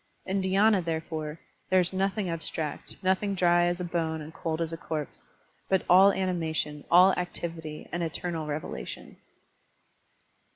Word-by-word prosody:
In 195 +1 0
dhy^na, 195 +1 +3
therefore, 160 -1 -4 0.3
there 185 0 +5
is 180 +1 0
nothing 195 +1 0
abstract, 160 -2 -4
nothing 190 +2 +1
dry 175 -1 +4
as 175 +1 -1
a - - -2
bone 165 -2 -1
and 155 +1 -9
cold 165 -1 -3
as 165 -1 -2
a - - -4
corpse, 155 -3 -6 0.4
but 190 -1 +2
all 190 +3 +7
animation, 160 -6 -2
all 180 +2 +7
activity, 165 -3 -5
and 175 - -2
eternal 165 -1 -2
revelation. 150 +1 -6
175 Hz, 140 wpm, -28 LUFS, 160-185 Hz, 0.4 s, all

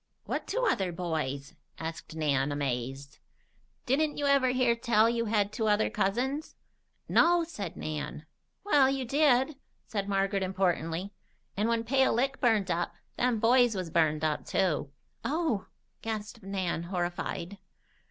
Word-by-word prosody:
"What - - -3
two - - 0
other 190 -7 +1
boys?" 155 -5 -3 0.2
asked 160 0 -6
Nan, 145 -3 +1
amazed. 135 +1 -3 0.7
"Didn't 295 +4 +1
you 290 - -1
ever 280 -2 +4
hear 250 -2 +3
tell 230 -2 +3
you 230 0 0
had 210 -2 +1
two 220 -1 -1
other 210 +1 +2
cousins?" 245 +8 -1 0.5
"No," 345 0 +4
said 205 - -6
Nan. 150 0 -5 0.4
"Well, 290 -9 +5
you 270 -1 -1
did," 270 +1 +3 0.3
said 200 -2 -3
Margaret 195 0 +1
importantly. 185 -1 -1 0.4
"And 210 +3 +1
when 230 -1 +1
Pale 265 +2 +3
Lick 270 +3 0
burned 215 -6 +3
up, 170 0 -1 0.2
them 245 -2 +1
boys 240 0 +4
was 180 -4 -4
burned 155 -2 +2
up, 155 -1 0
too." 165 -7 0 0.3
"Oh!" 300 - -1 0.3
gasped 220 +1 -5
Nan, 190 -4 -2
horrified. 175 +1 -3
205 Hz, 140 wpm, -29 LUFS, 170-250 Hz, 0.7 s, Well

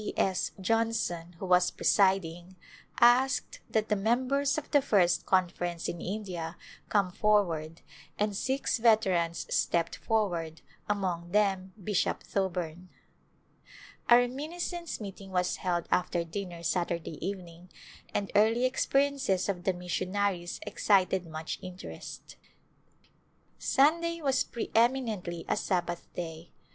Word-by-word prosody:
1\ 210 - -4
S. 190 -1 +1
Johnson, 205 -5 0
who 190 - -6
was 180 0 +4
presiding, 190 -2 +1 0.4
asked 255 +2 +4
that 220 -1 +1
the 210 - +3
mem 235 +6 +1
bers 280 +1 +1
of 310 - -5
the 285 - +5
First 190 -9 +2
Conference 175 -2 0
in 170 - -4
India 180 -4 -4 0.3
come 200 -3 +2
forward 170 -6 +1 0.4
and 210 -1 0
six 265 +3 0
veterans 190 -7 +3
stepped 170 -1 +1
forward, 175 -8 -1 0.3
among 180 -4 -1
them 190 -1 +1
Bishop 205 -1 0
Thoburn. 180 -2 -3 1.2
A 240 - +9
reminiscence 315 +7 -2
meeting 195 -2 -8
was 180 -1 0
held 175 -2 -1
after 175 -1 +1
dinner 170 0 -6
Sat 170 +1 +1
urday 165 -2 -4
evening 180 -2 -6 0.4
and 200 - -2
early 225 +4 +4
experiences 270 -6 +1
of 180 -3 -3
the 190 - +2
missionaries 180 0 -2
excited 190 -3 +2
much 155 0 -5
interest. 185 0 -9 1.2
Sunday 335 +4 +2
was 270 -4 +2
preeminently 225 -8 0
a - - +1
Sabbath 175 -2 -2
Day. 165 -1 -6
190 Hz, 120 wpm, -30 LUFS, 175-225 Hz, 1.2 s, A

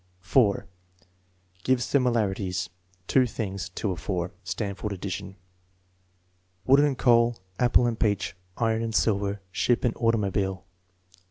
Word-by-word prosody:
'* - - -38
4. 100 +3 +2 1.0
Gives 130 -2 +2
similarities, 100 - 0 0.3
two 130 +5 +3
tilings. 100 -5 -4
( - - -6
of 95 -6 -1
4.) 90 -2 -2
(Stanford 100 +2 -3
addition.) 95 0 -5 1.3
Wood 135 +2 +6
and 145 -3 +2
coal; 120 -1 +4 0.2
apple 125 0 +4
and 115 -2 -1
peach; 100 -5 0 0.2
iron 115 -1 +1
and 115 -1 -3
silver; 100 -2 +1
ship 120 +5 +1
and 120 - +1
automobile. 100 -5 0
105 Hz, 120 wpm, -26 LUFS, 95-120 Hz, 1.3 s, Wood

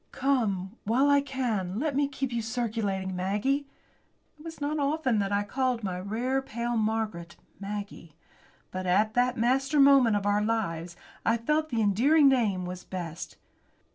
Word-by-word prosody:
"Come, 220 -7 -1
while 260 +7 +3
I 285 0 +5
can, 225 -9 -2
let 285 +2 -1
me 285 0 +2
keep 270 -2 -4
you 235 - -1
circulating, 215 -5 -2
Maggie!" 210 +10 -1 0.7
It - - -14
was 325 0 -9
not 295 +1 -2
often 280 -5 +1
that 200 0 -1
I 200 0 +1
called 250 +2 -1
my 180 -2 -3
"rare, 240 +8 -1
pale 240 -1 -3
Margaret" 215 -6 -2 0.2
Maggie. 200 -5 -7 0.6
But, 185 0 -4
at 210 +4 +2
that 250 +1 +1
master 270 +5 +1
moment 275 -5 +6
of 205 -1 -1
our 205 0 +2
lives, 180 -7 -2 0.3
I 230 - +2
felt 305 +7 0
that 240 - -4
the 225 - +2
endearing 275 +10 +4
name 215 -9 +2
was 180 0 -6
best. 170 -3 -7
225 Hz, 165 wpm, -28 LUFS, 195-270 Hz, 0.7 s, moment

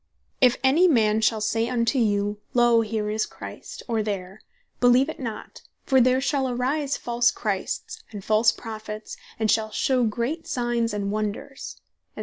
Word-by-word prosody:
"If 250 -2 +5
any 305 +8 +5
man 220 -7 +3
shall 220 0 +2
say 225 +2 0
unto 245 +2 +1
you, 205 -2 0 0.2
Loe, 240 -1 +5
here 215 -1 -2
is 215 0 -1
Christ, - - -9
or 225 -3 0
there, 195 -2 -5 0.4
beleeve 250 +3 +4
it - - -7
not, 230 -5 -7 0.2
for 265 -1 +4
there 255 +1 +4
shall 265 -1 0
arise 270 +4 -1
false 240 0 +2
Christs, 240 - -3
and 205 -3 -9
false 220 +1 +4
Prophets, 215 -1 -7 0.2
and 220 -1 +1
shall 220 -1 +1
shew 250 +2 +1
great 240 +9 -3
signes 240 -2 -1
and 200 -1 -2
wonders, 215 +6 -4 0.4
&c." - - -10
230 Hz, 160 wpm, -24 LUFS, 215-255 Hz, 0.4 s, If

